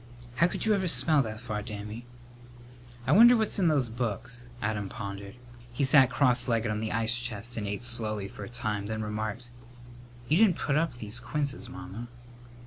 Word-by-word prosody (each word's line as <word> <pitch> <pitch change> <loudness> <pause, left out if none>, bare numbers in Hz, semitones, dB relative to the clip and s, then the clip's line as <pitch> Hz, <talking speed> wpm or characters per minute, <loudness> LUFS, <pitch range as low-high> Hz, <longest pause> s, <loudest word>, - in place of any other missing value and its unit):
"How 170 - +4
could - - -4
you 220 - +3
ever 190 -2 0
smell 155 -3 +7
that 110 -3 -5
far, 110 -3 -4
Dammy?" 105 +2 -8 1.0
"I 130 - 0
wonder 235 +8 +8
what's 220 -2 0
in 180 - +3
those 145 -6 +2
books?" 120 +1 -5
Adam 105 -2 -3
pondered. 100 -2 -7 0.4
He 120 +4 -2
sat 135 -1 +6
cross 125 -2 +2
legged 115 -2 0
on 105 - -2
the 110 0 -3
ice 115 +2 0
chest 120 -1 -6
and 105 -2 -4
ate 100 +3 -4
slowly 110 -4 -1
for 100 - -10
a 100 - -8
time, 105 -4 -3
then 110 0 -3
remarked, 110 +3 -5 0.8
"You 155 - +3
didn't 200 -5 +4
put 145 - -1
up 160 -4 0
these 110 0 -3
quinces, 135 +3 -3
Mamma." 95 +6 -8
120 Hz, 185 wpm, -28 LUFS, 105-135 Hz, 1.0 s, wonder